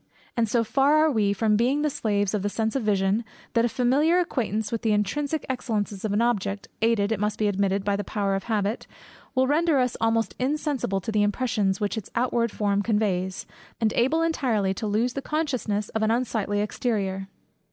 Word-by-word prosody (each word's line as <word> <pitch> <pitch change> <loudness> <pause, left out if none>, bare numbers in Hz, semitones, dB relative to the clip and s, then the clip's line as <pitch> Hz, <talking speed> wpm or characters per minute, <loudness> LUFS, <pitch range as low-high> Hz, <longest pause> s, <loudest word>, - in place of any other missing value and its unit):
And 230 -2 +1
so 230 +1 +2
far 275 +6 +3
are 310 0 +4
we 210 -5 +2
from 210 +1 +2
being 260 +7 +2
the 300 - +2
slaves 205 -5 0
of 210 - 0
the 205 - -1
sense 220 +2 -1
of 270 - +1
vision, 205 +1 +1 0.3
that 230 0 +3
a - - +1
familiar 275 +9 +2
acquaintance 220 - -1
with 230 - -2
the 220 -2 +2
intrinsic 285 +10 -1
excellences 215 -6 -2
of 215 - -1
an 210 +3 +2
object, 200 -4 -1
aided, 225 -2 +2
it 220 - 0
must 210 0 -1
be 215 - +1
admitted, 195 -1 0
by 200 -1 +1
the 205 - -2
power 200 0 -1
of 195 0 -2
habit, 215 -1 -1 0.5
will 260 0 +4
render 310 +2 +2
us 250 -2 +1
almost 225 0 +1
insensible 265 - -1
to 220 - -4
the 215 -1 +2
impressions 205 -2 0
which 210 +1 -1
its 200 - -12
outward 235 -2 +1
form 205 -1 0
conveys, 190 -4 -1 0.3
and 220 -2 +1
able 305 +7 +2
entirely 235 -12 +1
to 215 - -4
lose 225 +4 +1
the 275 - -3
consciousness 255 -10 -2
of 220 - -2
an 220 - +2
unsightly 220 -4 0
exterior. 200 -3 -2
220 Hz, 200 wpm, -25 LUFS, 205-250 Hz, 0.5 s, are